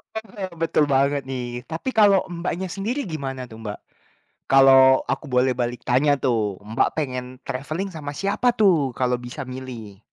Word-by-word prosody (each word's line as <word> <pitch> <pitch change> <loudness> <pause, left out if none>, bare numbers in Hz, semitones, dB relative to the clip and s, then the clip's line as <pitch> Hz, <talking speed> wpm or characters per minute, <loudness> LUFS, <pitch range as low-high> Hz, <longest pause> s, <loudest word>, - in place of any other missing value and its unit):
Heeh, 205 -3 -6
betul 155 -2 +2
banget 140 0 +2
nih. 125 -2 -5
Tapi 165 +10 -4
kalau 200 -3 +5
Mbaknya 175 +1 -3
sendiri 215 +10 -3
gimana 135 -5 -5
tuh, 110 -1 -12
Mbak? 105 -1 -5 0.7
Kalau 135 -1 +6
aku 135 +3 -2
boleh 125 -1 +2
balik 120 0 -2
tanya 135 +4 +3
tuh, 110 -7 0
Mbak 110 +2 +1
pengen 130 -5 -2 0.2
traveling 155 +9 -4
sama 150 -4 -7
siapa 200 +8 +1
tuh, 170 - +3
kalau 125 -1 0
bisa 125 +3 -7
milih? 125 -6 -8
135 Hz, 155 wpm, -23 LUFS, 125-170 Hz, 0.7 s, Kalau